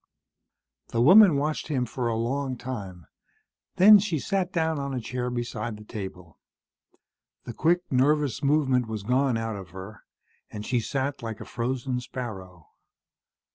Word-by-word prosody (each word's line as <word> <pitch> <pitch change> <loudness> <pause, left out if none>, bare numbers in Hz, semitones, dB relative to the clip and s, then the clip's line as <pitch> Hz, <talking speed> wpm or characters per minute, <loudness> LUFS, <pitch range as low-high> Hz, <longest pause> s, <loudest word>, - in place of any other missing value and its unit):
The 115 - -3
woman 185 - +8
watched 150 +2 -2
him 130 -5 0
for 120 +1 -3
a 115 - 0
long 130 +3 -2
time, 100 - -7 0.7
then 205 +3 +8
she 185 -5 -1
sat 190 +4 -1
down 160 -3 0
on 140 -1 -3
a - - -1
chair 125 +1 -3
beside 120 -2 -4
the 105 - -12
table. 95 -6 -8 1.0
The 120 - -7
quick, 170 +8 +2
nervous 140 0 +2
movement 140 -4 +2
was 110 -2 -5
gone 125 +2 +1
out 115 -1 -3
of 95 -2 -9
her, 95 +4 -10 0.5
and 105 0 -7
she 125 -2 +1
sat 135 +4 -3
like 115 -2 -6
a - - -8
frozen 125 +1 -3
sparrow. 95 - -8
125 Hz, 150 wpm, -26 LUFS, 110-140 Hz, 1.0 s, woman